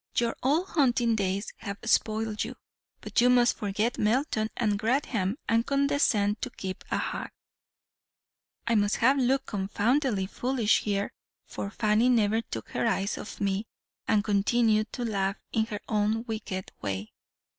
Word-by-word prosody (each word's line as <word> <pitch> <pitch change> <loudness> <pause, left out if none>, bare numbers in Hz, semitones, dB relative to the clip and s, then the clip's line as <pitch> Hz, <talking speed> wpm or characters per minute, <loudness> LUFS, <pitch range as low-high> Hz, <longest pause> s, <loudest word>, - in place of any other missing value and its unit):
Your 235 -1 +1
old 310 +8 +1
hunting 245 -6 +2
days 200 0 -2
have 200 -1 -6
spoiled 220 -1 +1
you; 240 +3 -6 0.5
but - - +1
you 250 - +5
must 245 -1 +4
forget 215 +2 -1
Melton 220 -1 +1
and 210 -3 +1
Grantham, 225 -3 0
and 230 0 +3
condescend 275 -7 +1
to 255 - -2
keep 190 -5 -6
a - - 0
hack.' - - -4 1.3
"I 235 - +1
must 205 -2 +2
have 265 +4 +3
looked 265 +2 +2
confoundedly 210 +3 0
foolish 240 +2 +1
here, 200 -1 -1 0.3
for 200 - -5
Fanny 215 +3 +2
never 225 -2 +3
took 115 - -7
her - - 0
eyes 200 -2 0
off 210 - -8
me, 200 +2 -1 0.4
and 210 -2 +3
continued 215 +1 +2
to 245 - -3
laugh 195 -3 -1 0.2
in 220 0 +1
her 210 -2 -5
own 215 +1 +1
wicked 215 -5 -5
way. 95 +2 -4
220 Hz, 150 wpm, -28 LUFS, 205-240 Hz, 1.3 s, you